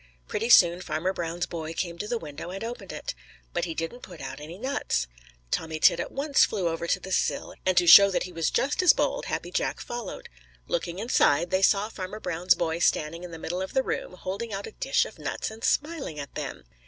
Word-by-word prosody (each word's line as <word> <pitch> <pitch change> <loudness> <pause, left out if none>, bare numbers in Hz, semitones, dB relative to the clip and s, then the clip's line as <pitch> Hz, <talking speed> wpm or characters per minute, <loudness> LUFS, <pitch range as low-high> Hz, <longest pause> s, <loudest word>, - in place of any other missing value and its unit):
Pretty 230 +3 -2
soon 175 -5 +7
Farmer 170 +3 -1
Brown's 170 0 -2
boy 160 -1 -5
came 170 +1 -3
to 210 - -3
the 240 +1 -1
window 155 -2 -8
and 195 +4 -6
opened 235 +1 -6
it. - - -5 0.4
But 175 0 0
he 165 -2 -5
didn't 165 +10 -4
put 175 -3 -11
out - - -6
any 155 +4 -9
nuts. 245 - -1 0.5
Tommy 160 -1 -2
Tit - - +5
at - - -3
once 280 +1 +3
flew 190 -6 +1
over 165 +1 -3
to - - +1
the 190 - -9
sill, - - 0
and 185 -1 +2
to 175 - +5
show 200 +4 +10
that 190 - 0
he 180 - -7
was 165 -2 0
just 285 +6 +1
as 365 - +7
bold, - - -1
Happy - - -3
Jack - - -1
followed. 240 -4 -6 0.4
Looking 170 +1 -2
inside, 180 - +2
they 190 0 +2
saw 200 +1 +4
Farmer 210 -1 -6
Brown's 180 -1 +2
boy 165 -1 -1
standing 165 0 +1
in 180 - -7
the 165 - -8
middle 175 +3 -4
of 190 - -5
the 265 - +3
room, - - -3
holding 195 +5 -5
out 200 0 -4
a - - -8
dish - - +1
of - - -11
nuts - - -3
and 220 +1 -11
smiling 290 - -1
at 140 -2 -7
them. - - -5
180 Hz, 230 wpm, -27 LUFS, 165-220 Hz, 0.5 s, show